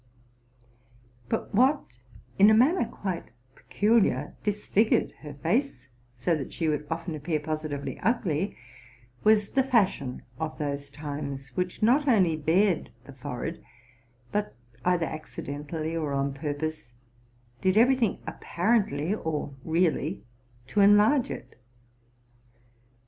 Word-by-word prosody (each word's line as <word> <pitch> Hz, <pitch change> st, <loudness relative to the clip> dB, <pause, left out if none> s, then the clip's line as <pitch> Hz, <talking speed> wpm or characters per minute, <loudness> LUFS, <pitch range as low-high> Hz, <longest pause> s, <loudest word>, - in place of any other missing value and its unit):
But -, -, -2 dB
what 255 Hz, -, +2 dB, 0.4 s
in 205 Hz, +2 st, +8 dB
a 215 Hz, -, +6 dB
manner 270 Hz, +8 st, +4 dB
quite 185 Hz, -4 st, -5 dB, 0.2 s
peculiar 205 Hz, -, +1 dB
disfigured 210 Hz, +1 st, +2 dB
her 150 Hz, -2 st, -9 dB
face, 175 Hz, -, -1 dB, 0.3 s
so 130 Hz, +8 st, +1 dB
that 140 Hz, -4 st, -5 dB
she 165 Hz, -, -2 dB
would 150 Hz, -1 st, -1 dB
often 165 Hz, +1 st, -3 dB
appear 155 Hz, +1 st, -2 dB
positively 150 Hz, -3 st, -4 dB
ugly, 195 Hz, -6 st, 0 dB, 0.7 s
was 210 Hz, -1 st, +4 dB
the 270 Hz, -, +3 dB
fashion 200 Hz, -, +1 dB, 0.2 s
of 160 Hz, -1 st, -3 dB
those 140 Hz, -2 st, -3 dB
times, 140 Hz, -2 st, -6 dB
which 180 Hz, -, -3 dB
not 270 Hz, +6 st, +4 dB
only 190 Hz, -10 st, +4 dB
bared 165 Hz, +4 st, +2 dB
the 140 Hz, -, -12 dB
forehead, 135 Hz, +4 st, -5 dB, 0.7 s
but, 210 Hz, 0 st, -2 dB, 0.3 s
either 180 Hz, -2 st, +2 dB
accidentally 155 Hz, +1 st, -5 dB
or 155 Hz, -4 st, -2 dB
on 140 Hz, 0 st, 0 dB
purpose, 145 Hz, -2 st, -4 dB, 0.7 s
did 190 Hz, +1 st, +2 dB
every 250 Hz, +4 st, +6 dB
thing 230 Hz, -6 st, 0 dB
ap -, -, -8 dB
parently 180 Hz, -5 st, +1 dB
or 150 Hz, -3 st, -2 dB
really 165 Hz, 0 st, 0 dB, 0.4 s
to 205 Hz, +10 st, +1 dB
enlarge 210 Hz, +7 st, +5 dB
it. -, -, -8 dB
165 Hz, 120 wpm, -27 LUFS, 145-210 Hz, 0.7 s, in